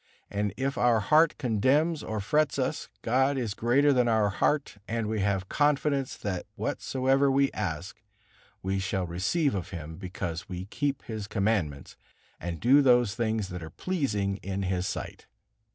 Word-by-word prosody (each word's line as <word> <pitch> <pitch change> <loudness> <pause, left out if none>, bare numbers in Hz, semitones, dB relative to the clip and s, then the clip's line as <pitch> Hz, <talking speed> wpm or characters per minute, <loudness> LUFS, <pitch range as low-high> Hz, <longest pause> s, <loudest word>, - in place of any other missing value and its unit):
And 100 0 -1
if 135 +2 -1
our 120 -2 +4
heart 155 +9 +4
condemns 140 +7 +2
or 110 -1 -3
frets 150 +8 +1
us, 130 -2 -2
God 130 +4 +2
is 115 -5 -2
greater 135 +7 +3
than 125 -2 +3
our 110 -3 +3
heart, 135 +1 0
and 115 0 -1
we 110 0 -1
have 95 -1 0
confidence, 145 -1 +1
that 95 -3 -4
whatsoever 135 +1 +1
we 135 0 +3
ask, 90 0 -4 0.6
we 95 +1 0
shall 95 -1 -1
receive 105 - 0
of 95 -3 -3
Him, 80 -3 -7
because 90 -2 -5
we 90 0 -5
keep 140 +6 -2
His 110 -3 -5
Commandments, 100 -10 -1 0.4
and 85 -2 -4
do 135 +5 +6
those 120 -5 +4
things 110 -3 -1
that 90 -2 -6
are 80 - -7
pleasing 105 - -1
in 95 0 -4
His 90 0 -1
sight." - - -6
110 Hz, 160 wpm, -28 LUFS, 95-135 Hz, 0.6 s, do